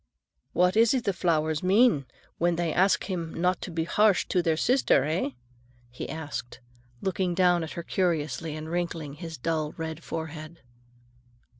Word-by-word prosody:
"What 180 +2 +3
is 230 +3 +5
it 250 - 0
the 200 - 0
flowers 160 -3 +1
mean 190 - +4 0.3
when 175 0 +2
they 170 -1 -1
ask 190 +2 +3
him 170 -4 -4
not 180 +2 +1
to - - -5
be 165 -1 -1
harsh 205 +3 +3
to 180 - +2
their 165 -2 +1
sister, 255 +9 +3
eh?" 155 0 0 0.6
he 125 - -6
asked, 145 -6 -6 0.4
looking 185 -2 0
down 180 -2 +3
at 160 - -6
her 170 - -5
curiously 160 -4 -1
and 155 0 -6
wrinkling 165 -3 -3
his 165 +1 -7
dull 155 +2 -1
red 160 0 -5
forehead. 160 0 -6
170 Hz, 160 wpm, -27 LUFS, 160-185 Hz, 0.6 s, is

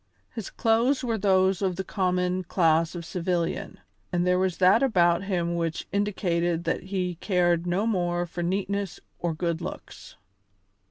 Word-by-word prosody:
His 225 -5 -5
clothes 235 +5 +2
were 230 -3 -1
those 190 -1 +3
of 190 -2 0
the 190 - -3
common 180 -1 0
class 165 -1 +2
of 170 -1 -6
civilian, 175 0 -2 0.3
and 175 0 +1
there 180 0 +3
was 185 -2 0
that 190 +4 +5
about 180 -8 +3
him 175 -3 -1
which 165 -1 -2
indicated 175 -4 0
that 165 +2 -2
he 180 -3 -3
cared 175 -3 +1
no 185 +5 +1
more 175 -5 0
for 175 +1 -6
neatness 195 +1 -2 0.2
or 170 -2 -1
good 170 0 -2
looks. - - -8
180 Hz, 155 wpm, -26 LUFS, 170-195 Hz, 0.3 s, that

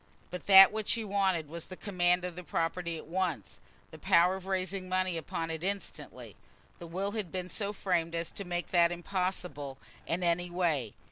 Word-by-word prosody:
But 180 -2 -7
that 195 -1 +10
which 215 0 0
he 230 -1 -2
wanted 195 -6 0
was 170 +2 -7
the 185 - -9
command 180 -3 +1
of 180 -2 -5
the 180 - -7
property 170 +1 -2
at - - -9
once, 170 - -3 0.3
the - - -11
power 180 +2 +4
of 190 0 -9
raising 190 0 -2
money 185 -1 0
upon 165 +1 -3
it 160 +1 -5
instantly. 200 +1 -5 0.4
The 170 - -8
will 190 +4 -2
had 210 -5 -4
been 185 -1 -4
so 205 0 -2
framed 175 -5 -1
as 165 0 -3
to 200 - -6
make 175 -1 -4
that 170 -1 +5
impossible 175 -6 -3 0.3
in 175 +2 -1
any 175 +1 +1
way. 160 - 0
180 Hz, 190 wpm, -31 LUFS, 170-190 Hz, 0.4 s, that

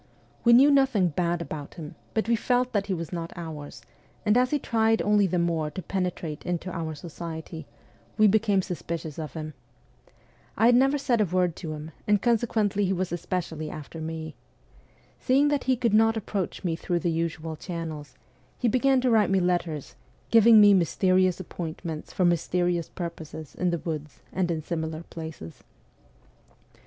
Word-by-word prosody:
We 235 - +5
knew 270 +5 +7
nothing 265 -10 +3
bad 170 +1 -1
about 150 -3 -7
him, 155 -4 -8 0.2
but 220 - 0
we 235 - +3
felt 250 +2 0
that 200 -1 0
he 195 - 0
was 165 0 -6
not 165 -1 -4
' - - -27
ours,' 150 -7 -8 0.4
and 210 0 +4
as 250 +1 +4
he 295 - +1
tried 225 -4 +1
only 205 -1 +3
the 180 0 -1
more 165 -3 0
to 185 - -6
penetrate 180 -5 -3
into 180 +1 -3
our 160 -2 -4
society, 160 0 -7 0.5
we 215 - +5
became 205 -2 +3
suspicious 165 -3 -5
of 155 -2 -6
him. 155 -1 -6 1.0
I 220 - +4
had 240 - +6
never 270 +4 +4
said 245 -5 +1
a - - +4
word 180 -2 0
to 160 -4 -5
him, 155 +1 -8 0.2
and 210 -1 +4
conse 240 +1 +2
quently 205 -2 +1
he 190 - +1
was 185 -1 -2
especially 170 -3 -3
after 155 +2 -8
me. 160 0 -5 0.9
Seeing 280 +3 +3
that 290 -2 0
he 260 0 +3
could 235 -3 +1
not 225 +1 +4
approach 200 -3 -3
me 170 -3 0
through 175 +1 -2
the 175 - 0
usual 160 -1 -3
channels, 160 -4 -6 0.4
he 245 - 0
began 260 +3 +3
to 250 -1 +2
write 220 -3 +4
me 195 0 +3
letters, 175 -5 -1 0.4
giving 230 -1 +8
me 205 -1 +8
mysterious 185 0 +2
appointments 165 -3 -6
for 185 - +1
mysterious 175 0 +1
purposes 160 -3 -7
in 180 - 0
the 170 - 0
woods 155 -2 -6
and 185 -2 0
in 160 -2 -2
similar 160 -1 -4
places. 160 - -8
180 Hz, 175 wpm, -26 LUFS, 160-215 Hz, 1.0 s, giving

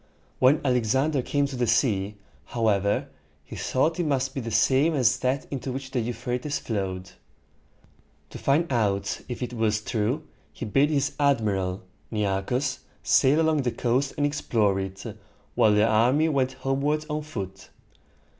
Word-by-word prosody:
When 130 +4 +5
Alexander 130 +3 +2
came 145 +3 0
to 140 -1 -5
the 120 -1 0
sea, 105 -4 +1 0.3
however, 105 -4 +1 0.4
he - - -9
thought 160 +6 0
it - - +2
must 135 -2 0
be 135 - -3
the 115 - -5
same 135 +8 +3
as 125 -1 +3
that 130 +2 0
into 135 -1 -4
which 130 0 -6
the 130 - 0
Euphrates 120 +4 -2
flowed. 95 -4 -4 1.2
To - - -8
find 145 +2 +1
out 100 -4 0
if 125 - -5
this 125 -1 -4
was 110 -2 +1
true, 115 +7 -1 0.3
he - - -7
bade 135 +7 +3
his 145 -2 +1
admiral, 105 -10 +1 0.3
Ne 105 -2 -1
ar´chus, 125 +7 -1 0.2
sail 140 +3 +4
along 160 -2 +2
the 125 - 0
coast 125 +3 0
and 145 - +2
explore 110 -9 +1
it, 95 0 -5 0.5
while 110 - +4
the 105 +1 +4
army 125 +8 +3
went 130 -3 +1
homeward 140 +3 -1
on 150 0 -2
foot. 95 -10 -7
125 Hz, 155 wpm, -26 LUFS, 105-140 Hz, 1.2 s, When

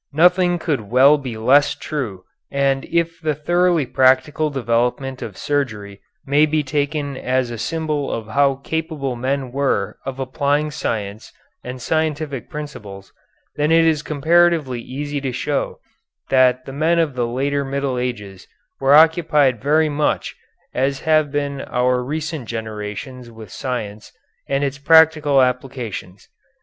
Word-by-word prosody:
Nothing 180 +3 +4
could 140 -11 -3
well 135 +4 +5
be 125 -5 -6
less 135 +6 +4
true, 115 -12 -5 0.3
and 135 -1 0
if 170 0 -1
the 155 -2 0
thoroughly 175 +1 +1
practical 130 +5 +2
development 125 0 -1
of - - -7
surgery 110 -9 -3 0.2
may 145 +3 +3
be 155 0 0
taken 145 0 -2
as 130 -1 -1
a 120 - -5
symbol 155 -1 -2
of 110 -1 -5
how 140 +4 +2
capable 155 -5 -3
men 130 +1 -2
were 140 +1 -1
of 135 -1 -5
applying 145 +3 0
science 110 -7 -4 0.3
and 125 +1 -7
scientific 150 -1 -2
principles, 105 - -9 0.4
then 150 +1 +1
it 165 0 +5
is 155 -2 +2
comparatively 155 -3 +2
easy 145 +3 -5
to 135 -2 -2
show 140 +3 -2 0.5
that 130 -1 +3
the 135 - -8
men 160 +4 +1
of 160 -4 +1
the 120 -2 -1
later 140 +4 -1
Middle 135 -2 -2
Ages 105 -7 -5 0.3
were 135 +1 +5
occupied 150 -6 +4
very 155 +3 +3
much 150 0 -1 0.4
as 135 +1 -1
have 155 -2 +2
been 140 -1 -2
our 125 0 0
recent 155 -1 -4
generations 110 +3 -6
with 110 -2 -12
science 110 -6 -5 0.4
and 140 +1 0
its 140 0 -2
practical 155 -3 +5
applications. 125 -7 -4
140 Hz, 140 wpm, -20 LUFS, 125-150 Hz, 0.5 s, well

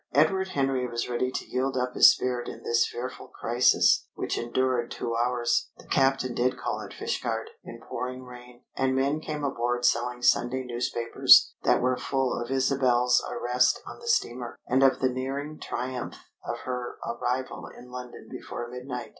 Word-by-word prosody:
Edward 190 +6 +3
Henry 135 -6 0
was 120 -1 -3
ready 125 +1 -1
to - - -4
yield 130 +1 -1
up 125 0 -1
his - - +9
spirit 125 -1 -2
in - - -9
this 115 0 +2
fearful 130 +1 -6
crisis, 120 +2 +3
which - - -2
endured 120 0 0
two 115 - -3
hours. 120 0 +1
The - - -16
captain 135 -2 +1
did 125 +2 0
call 120 - -3
at - - -9
Fishguard, - - -3
in - - -10
pouring 125 0 -5
rain, 125 -1 -13
and 130 0 +1
men 140 +3 +1
came 150 -1 -5
aboard 120 -2 -1
selling 120 +1 +1
Sunday 130 +2 +2
newspapers 120 -1 +4
that - - +2
were 125 0 +2
full 135 -2 -1
of 120 - -4
Isabel's 130 -2 +2
arrest 125 +1 +2
on - - -9
the 470 - -11
steamer, 120 - -1
and 130 +2 +2
of 135 -1 +4
the 130 - +3
nearing 135 +4 -4
triumph 125 0 -4 0.3
of - - -5
her 125 -1 -4
arrival 125 +2 -3
in 125 0 -13
London 125 -1 -9
before 120 - -6
midnight. 125 -1 -6
125 Hz, 170 wpm, -27 LUFS, 120-130 Hz, 0.3 s, his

